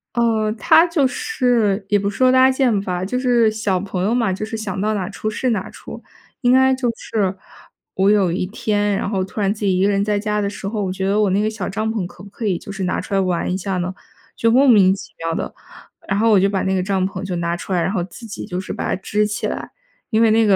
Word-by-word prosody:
哦， 225 -2 +1
它 320 - +5
就 330 -5 +1
是 245 - 0
也 205 - +3
不 200 0 -1
是 205 - -8
说 255 0 +5
搭 260 0 +6
建 260 -6 +2
吧， 180 -2 -3
就 250 +6 -2
是 240 -3 +3
小 210 -4 -1
朋 185 -1 -3
友 210 +4 +1
嘛， 230 -5 +1
就 205 +3 -4
是 220 - -6
想 205 -3 -4
到 215 +2 0
哪 190 -4 -2
出 215 +1 -4
是 250 +4 -1
哪 210 -5 -1
出。 - - -10 0.4
应 245 -1 +3
该 265 0 +5
就 255 -2 0
是， 195 -5 -2 0.6
我 190 +1 +3
有 200 -4 +3
一 180 - -1
天， 205 0 0
然 195 - -2
后 195 -3 0
突 190 +3 -5
然 200 0 +2
自 210 -1 -5
己 190 -2 +2
一 185 - +2
个 200 - +3
人 200 -1 +1
在 210 -1 +1
家 210 0 -1
的 200 -1 0
时 200 -1 -7
候， 210 0 -2
我 185 - -2
觉 190 +1 -3
得 200 +2 +2
我 210 -2 +3
那 195 +2 +2
个 215 - +1
小 220 - -5
帐 215 +3 -2
篷 215 -5 -2
可 180 - -14
不 200 - -11
可 220 +3 -6
以 190 -4 +1
就 200 - -9
是 195 -1 -4
拿 185 - -1
出 - - -7
来 195 - +3
玩 180 -2 0
一 185 - 0
下 190 0 -3
呢？ 180 +1 -2 0.4
就 230 - +2
莫 265 +4 +5
名 200 -6 +6
其 195 - -11
妙 165 0 -3
地， - - -4 0.5
然 195 - 0
后 225 +2 +3
我 205 - +6
就 195 - +3
把 195 -1 -1
那 190 - 0
个 185 - +1
帐 190 0 0
篷 190 0 -6
就 190 -2 -3
拿 170 0 -1
出 190 - -5
来， 175 - +2
然 190 - 0
后 190 -4 -1
自 195 +6 -12
己 215 - -7
就 180 - -4
是 - - -7
把 - - -4
它 - - +1
支 210 +1 +1
起 210 - -3
来。 - - -5 0.4
因 220 -1 +2
为 225 -1 +5
那 225 +1 +4
个 200 - +5
205 Hz, 305 characters per minute, -20 LUFS, 190-225 Hz, 0.6 s, 搭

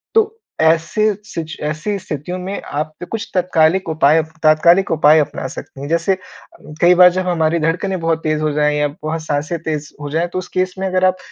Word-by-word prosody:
तो 445 0 +2 0.2
ऐसे 170 +7 +2
सिच 165 -6 -6
ऐसी 155 +7 -2
स्थितियों 170 +1 -5
में 190 +2 -5
आप 155 +2 -4
पे 175 - -6
कुछ 225 +3 -5
तात्कालिक 180 0 +2
उपाय 155 0 +4 0.2
तात्कालिक 170 +5 +4
उपाय 155 -1 +5
अपना 140 -2 -2
सकती 135 - -10
हैं। 140 - -5
जैसे 170 +3 +1 0.6
कई 175 +1 +6
बार 180 0 +8
जब 185 0 -2
हमारी 165 -1 +1
धड़कनें 180 +4 -1
बहुत 165 -1 0
तेज़ 155 -1 0
हो 155 0 0
जाएँ 150 0 +1
या 150 - +2 0.2
बहुत 160 +1 -3
साँसें 150 +3 -2
तेज़ 155 -2 -4
हो 145 - -5
जाएँ, 165 +3 0
तो 180 +1 -4
उस 185 - -7
केस 185 0 -2
में 190 - -2
अगर 185 0 +1
आप 185 0 +2
165 Hz, 200 wpm, -18 LUFS, 155-185 Hz, 0.6 s, बार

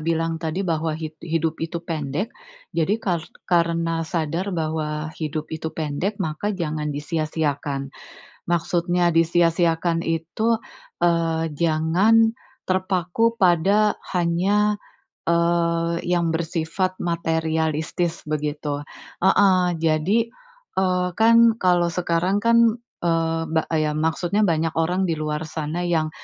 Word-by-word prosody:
bilang 165 0 -1
tadi, 165 +4 -2
bahwa 160 -2 -1
hid 160 -1 -6
hidup 165 -1 -1
itu 165 +1 -3
pendek. 155 - -3 0.4
Jadi, 170 +6 +1
kar 185 -7 -1 0.2
karena 170 -1 +1
sadar 165 +3 -2
bahwa 155 -1 -2
hidup 155 -1 -5
itu 160 0 -3
pendek, 160 +7 -3
maka 160 +2 -2
jangan 155 -3 -2
disia-siakan. 145 -2 -2 0.6
Maksudnya 175 +1 +1
disia-siakan 165 0 +2
itu, 170 +8 0 0.5
eee, 165 -1 +2
jangan 170 +9 +3 0.3
terpaku 185 +4 0
pada 195 +2 +4 0.2
hanya, 200 +5 +2 0.4
eee, 170 0 +1
yang 175 -1 +1
bersifat 170 +3 -2
materialistis, 160 0 -1
begitu 150 -1 -2 0.4
heeh. 190 -1 +5 0.2
Jadi, 165 +8 +2 0.5
eee, 180 -1 +1
kan 230 +1 +6
kalau 180 -4 +2
sekarang 180 +3 0
kan, 230 0 +5 0.4
eee, 165 -1 0
ba 160 0 +1
eee, 155 -1 +2
ya - - 0
maksudnya 170 +6 +1
banyak 165 -3 +1
orang 180 +4 +1
di 165 - +1
luar 155 0 -3
sana 160 +3 -3
yang, 160 -3 +1
165 Hz, 110 wpm, -23 LUFS, 160-180 Hz, 0.6 s, kan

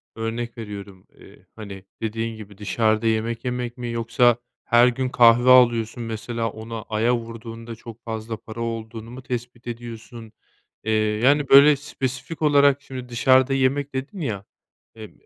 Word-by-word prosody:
örnek 115 +1 -4
veriyorum. 100 -4 -9
Eee, - - -17
hani, 100 -3 -9 0.2
dediğin 115 +1 -3
gibi 105 -2 -12
dışarıda 110 +2 +1
yemek 115 +2 -1
yemek 125 0 -3
mi 120 -1 -5
yoksa 115 +1 +2 0.3
her 120 +1 +5
gün 130 +1 -1
kahve 120 0 +5
alıyorsun. 120 -2 +5
Mesela, 115 +1 -3
ona 110 +1 -7
aya 115 +3 +2
vurduğunda 115 0 -8
çok 115 0 -12
fazla 110 -1 -5
para 115 +2 -9
olduğunu 115 0 -5
mu 130 +1 -10
tespit 120 -1 -6
ediyorsun? 115 -1 -8 0.5
Eee, 110 - -1
yani, 110 +7 +2
böyle, 145 +2 +8
spesifik 135 +1 -5
olarak 145 -2 +4
şimdi 130 -3 -8
dışarıda 130 +2 +4
yemek 135 +1 0
dedin 135 +9 -5
ya, 105 -9 -3 0.5
eee, 110 -2 -10
115 Hz, 145 wpm, -23 LUFS, 110-125 Hz, 0.5 s, böyle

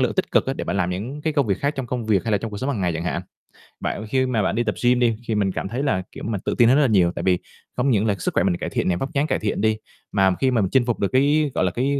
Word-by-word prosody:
lượng - - +2
tích - - -1
cực - - +3
á - - 0
để - - -4
bạn - - -2
làm 90 -2 0
những 115 +11 -5
cái 155 0 0
công 140 -4 +1
việc 100 -2 0
khác 140 +2 -1
trong 135 -2 -3
công 120 -2 -3
việc 105 -4 +2
hay 115 - -1
là 100 - +3
trong 115 +2 -5
cuộc 100 - -6
sống 130 +5 -1
hàng 120 -8 -2
ngày 90 -2 +1
chẳng 85 +1 -4
hạn. 90 - -2 0.6
Bạn 110 - -3
khi 130 +4 +1
mà 125 -4 0
bạn 95 - 0
đi 120 - +1
tập - - -1
gym 125 0 +4
đi, 115 -3 +2
thì, 110 - 0
mình 100 -2 +1
cảm 95 - -4
thấy 125 +7 -3
là, 95 -10 +1
kiểu, - - -9
mà 110 -2 -2
tự - - -1
tin 120 - +6
hơn 130 - +5
rất - - +4
là 140 - +4
nhiều, 95 -6 +3
tại 85 - -4
vì 90 -1 +2 0.4
không 125 +3 +2
những 105 -1 +2
là 105 -3 +1
sức - - -2
khỏe - - +2
mình 90 -2 +1
cải - - -4
thiện - - -1
nè, 90 - +2
vóc 135 - -4
dáng 145 +2 +1
cải - - 0
thiện 105 -2 -2
đi, 110 0 +2 0.3
mà 95 -2 +3
khi 130 -1 +2
mà 120 -3 +2
mình 95 - 0
chinh 130 -2 +3
phục 120 - -1
được 100 - +1
cái, 145 +3 +3
gọi - - +2
là, 90 - +1
cái, 140 +6 0
115 Hz, 360 wpm, -22 LUFS, 95-130 Hz, 0.6 s, tin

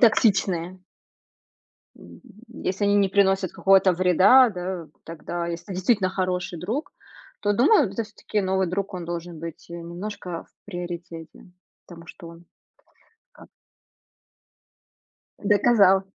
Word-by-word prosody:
токсичные. 190 -6 +2 1.2
М, - - -16
м, - - -14 0.4
м, 235 - -11
если 195 +2 -1
они 205 0 +3
не 200 -1 +3
приносят 195 -2 +2
какого-то 195 -1 +4
вреда, 185 +8 +5
да, 180 -3 -5 0.2
тогда, 170 +1 -5
если 170 +3 -6
действительно 190 +1 +1
хороший 180 -2 -2
друг, 255 - -4 0.5
то 205 0 +1
думаю, 275 - +4
да, - - -11
то 230 - 0
всё-таки 215 0 -4
новый 190 -1 0
друг, 195 +3 -3
он 180 -2 -5
должен 170 0 -6
быть, 165 0 -9
э, - - -7
немножко 180 +3 -7
в - - -35
приоритете, 175 -3 -8 0.4
потому 170 -1 -13
что 165 +1 -11
он 170 +1 -14 0.9
как - - -17 1.9
Доказал. 200 -2 +4
185 Hz, 130 wpm, -24 LUFS, 175-205 Hz, 1.9 s, вреда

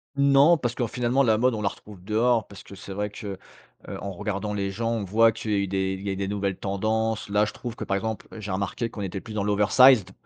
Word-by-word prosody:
Non, 140 +4 +5
parce 120 -4 -2
qu'en 120 - 0
finalement 125 +3 +1
la 110 -3 +3
mode 125 0 +2
on 105 - -4
la 100 - +2
retrouve 100 -3 -13
dehors, 110 +2 +2
parce 100 - -12
que 100 - -12
c'est 95 0 -9
vrai 105 +1 -2
que, 105 -2 -7 0.5
heu - - -6
en 100 - -5
regardant 105 +2 -3
les 100 -1 -2
gens, 115 +4 -2
on 115 -3 -1
voit 110 +4 +4
qu'il 100 -3 -2
est 95 0 0
il 95 +1 -8
est 95 - -1
des 100 0 -3
nouvelles 100 -1 -2
tendances, 110 +3 -1
là 105 +1 +3
je 110 - -6
trouve 120 -2 -7
que - - -6
par 100 - -1
exemple, 110 +2 -4
j'ai 105 -2 -5
remarque 100 +5 -2
qu'on 110 - -8
était 95 -1 -4
plus 110 - -9
dans 105 -2 -1
l' 105 - -1
oversized. 105 0 +5
105 Hz, 250 wpm, -25 LUFS, 100-115 Hz, 0.5 s, Non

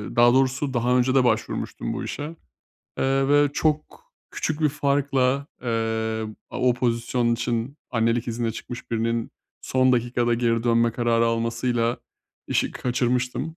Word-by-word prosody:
daha 120 +1 +6
doğrusu 135 +1 +1
daha 125 +1 +2
önce 130 +2 +2
de 130 - +5
başvurmuştum 110 -3 -1
bu - - -4
işe, 145 - -5 0.8
eee, 135 0 +2
ve 145 0 +5
çok 155 - -1 0.3
küçük 155 0 -3
bir 155 - +4
farkla, 140 -2 +1 0.2
eee, 110 -2 -1 0.3
o 125 -1 +1
pozisyon 120 -1 0
için, 120 +3 -2
annelik 115 +1 +1
iznine 115 -1 -2
çıkmış 120 +2 -8
birinin, 115 0 -1 0.3
son 130 0 +2
dakikada 120 0 +1
geri 115 -1 +1
dönme 115 -1 +3
kararı 115 -1 +2
almasıyla 115 +1 0 0.5
işi - - 0
kaçırmıştım. 125 +5 -1
120 Hz, 135 wpm, -24 LUFS, 115-130 Hz, 0.8 s, daha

